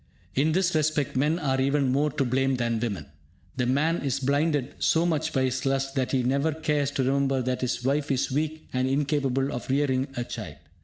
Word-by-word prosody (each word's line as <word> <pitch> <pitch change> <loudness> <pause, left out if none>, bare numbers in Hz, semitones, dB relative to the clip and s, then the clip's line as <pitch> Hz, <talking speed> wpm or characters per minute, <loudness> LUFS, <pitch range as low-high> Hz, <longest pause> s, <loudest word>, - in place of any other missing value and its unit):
In 150 +6 +2
this 185 0 +2
respect, 155 -2 0
men 150 +5 +2
are 135 -5 0
even 140 -1 +2
more 145 +3 +2
to 135 - 0
blame 135 +2 +1
than 115 -2 0
women. 110 -5 -3 0.5
The 125 -2 +1
man 155 +6 +2
is 135 -1 -1
blinded 140 0 0
so 165 +1 +3
much 160 -4 0
by 130 - +1
his 130 0 -1
lust 135 0 0
that 130 -2 -1
he 130 -2 +1
never 140 +5 +1
cares 150 -2 0
to 135 - 0
remember 135 0 +1
that 125 0 -2
his 125 -1 -1
wife 140 +3 0
is 135 -1 0
weak 155 +3 -2
and 130 0 +1
incapable 135 -1 0
of 120 - -6
rearing 135 -1 +1
a 120 - 0
child. 105 -11 -7
135 Hz, 205 wpm, -26 LUFS, 130-150 Hz, 0.5 s, so